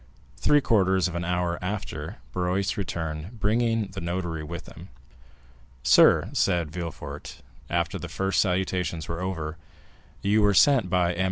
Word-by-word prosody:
Three 145 +12 +3
quarters 95 - +3
of 90 - -6
an 85 0 -2
hour 90 0 -1
after, 90 -5 -4 0.2
Barrois 90 +2 0
returned, 85 +2 -4
bringing 115 0 +1
the 95 0 -7
notary 85 -2 -3
with 85 +2 -7
him. - - -12 0.9
"Sir," - - +5
said 85 -5 +1
Villefort, 85 -1 -7 0.3
after 85 -1 -1
the - - -7
first 95 -1 +1
salutations 90 -3 -1
were 85 +1 -4
over, 80 -4 -3 0.7
"you 105 +2 +3
were 105 -1 +4
sent 135 0 +5
for - - -8
by 90 -1 +2
M. 85 - -7
90 Hz, 150 wpm, -26 LUFS, 85-100 Hz, 0.9 s, Sir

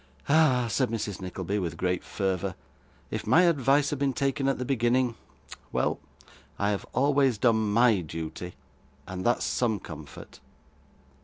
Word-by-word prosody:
'Ah!' 140 -5 +4
said 125 +2 0
Mrs. 105 -4 -4
Nickleby, 95 +2 -3
with 85 -3 -3
great 90 0 -1
fervour, 95 -3 -2 0.6
'if - - -4
my 180 - +6
advice 145 -3 +3
had 145 - -3
been 140 -1 +1
taken 135 +1 0
at 135 - +1
the 125 - -3
beginning 125 -1 +1 0.6
Well, - - 0 0.6
I 100 +1 +1
have 100 - -3
always 135 -3 +2
done 110 -2 +2
MY 115 -1 +4
duty, 80 +2 -6 0.5
and 95 0 -6
that's 120 - +1
some 110 -4 0
comfort. 75 -4 -11
115 Hz, 145 wpm, -27 LUFS, 95-135 Hz, 0.6 s, my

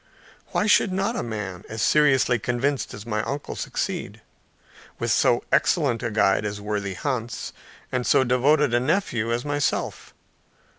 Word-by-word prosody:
Why - - 0
should 205 -2 +4
not 195 +5 -1
a - - -1
man 105 -5 -5
as 110 - -6
seriously 135 -5 +4
convinced 125 +5 -1
as 105 - -10
my 105 -2 -1
uncle, 140 +5 -4
succeed, - - -4 0.8
with - - -1
so - - +3
excellent 115 - +2
a 120 - -1
guide 105 -2 +2
as 105 0 -4
worthy 100 -2 -3
Hans, 120 0 -3 0.4
and 125 -1 -1
so 130 - +4
devoted 130 +2 +3
a 120 - +4
nephew 125 - 0
as 120 +3 -1
myself? 145 0 -2
120 Hz, 150 wpm, -24 LUFS, 105-145 Hz, 0.8 s, should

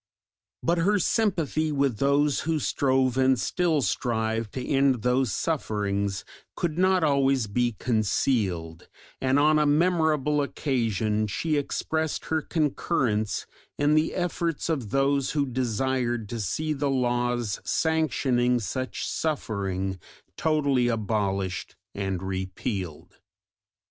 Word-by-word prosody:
But 170 +1 +2
her 205 +5 +3
sympathy 165 - +1
with 140 -6 0
those 140 +1 +2
who 160 +2 0
strove 130 -3 +1
and 130 -1 +4
still 165 -4 +1
strive 110 +1 -1
to 130 - -4
end 135 -4 +2
those 125 -1 +2
sufferings 100 - -1 0.3
could 160 -3 -2
not 185 0 +3
always 135 -4 +2
be 120 +3 0
concealed, 100 -7 -1 0.3
and 130 +1 +2
on 155 +1 +4
a 150 - +3
memorable 150 -2 +2
occasion 110 -7 0
she 155 +10 -1
expressed 160 +2 -2
her 160 -1 0
concurrence 125 - 0 0.3
in 145 +1 +3
the 155 +1 +2
efforts 170 -3 -2
of 135 -10 -1
those 135 +2 +1
who 145 -2 +1
desired 125 -2 -1
to 120 - -4
see 155 - -1
the 145 -1 -1
laws 120 -3 0
sanctioning 130 -6 +1
such 130 +4 -3
suffering 95 - -2 0.4
totally 145 -5 +2
abolished 100 -5 -1 0.2
and 95 -2 -3
repealed. 95 - -4
130 Hz, 115 wpm, -26 LUFS, 110-150 Hz, 0.4 s, and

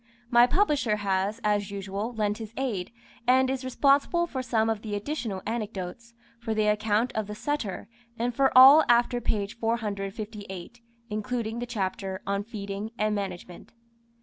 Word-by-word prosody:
My 240 0 +7
Publisher 295 - +2
has, 200 +1 -1
as 205 -2 +1
usual, 200 +3 -4
lent 210 -1 -1
his 220 0 -8
aid, 220 -9 -2 0.4
and 260 +1 +4
is 265 -1 -3
responsible 280 +6 +2
for 270 -6 -4
some 230 -3 +1
of 220 -2 -1
the 210 -2 -4
additional 210 -4 -4
anecdotes, 220 0 -5 0.2
for 225 -2 -3
the 215 0 +2
account 210 +3 +1
of 215 -2 -2
the 210 - -6
Setter, 235 -7 -3 0.3
and 240 +1 -1
for 270 +2 +3
all 275 +5 +10
after 240 0 +3
page 210 -1 -2
458, 210 -1 -4 0.3
including 225 +1 -3
the 245 - -4
chapter 195 -3 -3
"On 200 0 -1
Feeding 205 -1 -5
and 215 0 +1
Management." 185 -2 -6
220 Hz, 150 wpm, -27 LUFS, 200-245 Hz, 0.4 s, all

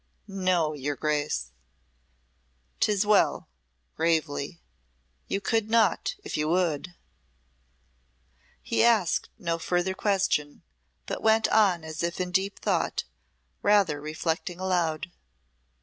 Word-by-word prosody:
"No, 185 -5 +1
your 145 0 -3
Grace." 145 - -1 1.3
"Tis 210 -1 +2
well," 210 -1 +3 0.5
gravely, 160 -1 -1 0.7
"You 195 - -1
could 220 +2 0
not 225 -5 +2
if - - -5
you 150 0 0
would." 175 -1 0 1.7
He - - +1
asked 225 -7 +3
no 170 -1 -2
further 175 +2 0
question, 190 -7 0 0.4
but - - -4
went 220 0 +4
on 190 -6 +3
as 160 +1 -6
if 170 +1 -2
in 180 -1 -2
deep 195 +2 0
thought, - - 0 0.6
rather 200 -8 +3
reflecting 160 +3 -3
aloud. 175 -3 -1
175 Hz, 105 wpm, -27 LUFS, 155-195 Hz, 1.7 s, went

